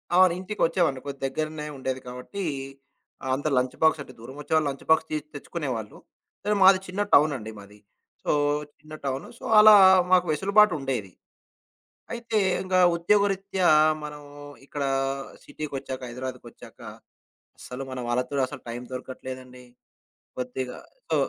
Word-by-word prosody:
అవును, 185 -1 +6
ఇంటికొచ్చేవాడిని. 170 -7 0
కొద్ది 140 -1 -7
దగ్గరనే 155 +2 -4
ఉండేది 130 0 -3
కాబట్టి, 125 +11 -6 0.8
ఆ! - - -6
అంత 145 +3 -3
లంచ్ 125 0 0
బాక్స్ 160 -1 +4
అంటే - - -10
దూరం 125 +4 -10
వచ్చేవాళ్ళు 155 0 +1
లంచ్ 135 -1 -8
బాక్స్ 160 0 +4
తీసి 155 -1 -2
తెచ్చుకునేవాళ్ళు. 130 -8 -5 0.5
సరే, 210 - +1
మాది 190 0 +7
చిన్న 190 +3 -3
టౌను 150 +1 +6
అండి 110 -1 -8
మాది. 105 +1 -15 0.4
సో, - - 0 0.5
చిన్న 155 0 -14
టౌను. 135 0 -3
సో, - - -16 0.2
అలా 215 0 +9 0.4
మాకు 180 -1 +5
వెసులుబాటు 200 +4 +4
ఉండేది. 125 -8 -3 1.0
అయితే 235 -2 -2 0.3
ఇంకా 185 0 +1 0.2
ఉద్యోగరీత్యా 195 0 +1 0.4
మనము 150 -1 -9 0.4
ఇక్కడ 140 0 -4 0.6
సిటీకొచ్చాక, 135 -3 -6
హైదరాబాదుకొచ్చాక 130 +2 -9 0.8
అసలు 125 +2 -7
మన 130 - -5
వాళ్ళతోని 125 +3 -1
అసలు - - -9
టైం 120 +1 -5
దొరకట్లేదండి. 130 0 -8 0.7
కొద్దిగా 125 0 -4 0.3
సో - - +2
145 Hz, 130 wpm, -26 LUFS, 130-180 Hz, 1.0 s, అలా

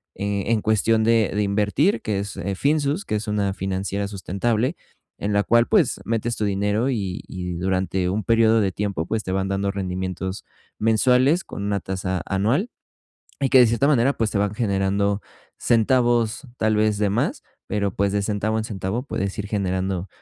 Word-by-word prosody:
eh, 100 -1 -2
en 115 -2 +2
cuestión 110 +1 +2
de 115 -2 +3
de 105 +1 +1
invertir, 105 - +1
que 105 -2 -1
es, 100 0 -5
eh, 95 +2 -3
Finsus, 145 - +1
que - - -2
es 105 +1 -3
una 100 -2 0
financiera 95 +1 -2
sustentable, 105 - -1 0.4
en 105 +1 -2
la 100 0 +3
cual 120 +1 +3
pues, 190 - +2
metes 115 +1 -1
tu 105 - 0
dinero 105 +5 0
y 100 -8 -2
y 90 -2 -5
durante 95 0 -1
un 105 +3 -1
período 115 +1 +4
de 95 - +1
tiempo, 100 -4 -2
pues, 110 +2 -2
te 95 - -4
van 95 0 0
dando 100 0 0
rendimientos 95 0 -4 0.3
mensuales 125 - +3
con 100 - -6
una 100 -1 0
tasa 95 -1 -3
anual 115 - 0 0.7
y 135 - +2
que 130 - +7
de 125 - +7
cierta 120 +5 +2
manera, 135 -1 +3
pues, 115 -2 0
te 105 - -1
van 100 0 0
generando 100 -1 0 0.4
centavos, 120 +1 +2
tal 110 -1 +2
vez, 105 -1 +2
de 105 -1 +1
más, 140 - -1 0.3
pero 100 -2 -1
pues 100 0 +1
de 105 - +1
centavo 105 +1 -1
en 110 - -2
centavo 105 +2 -3
puedes 100 -7 -3
ir 105 - -3
generando 95 -2 -2
105 Hz, 185 wpm, -23 LUFS, 95-115 Hz, 0.7 s, que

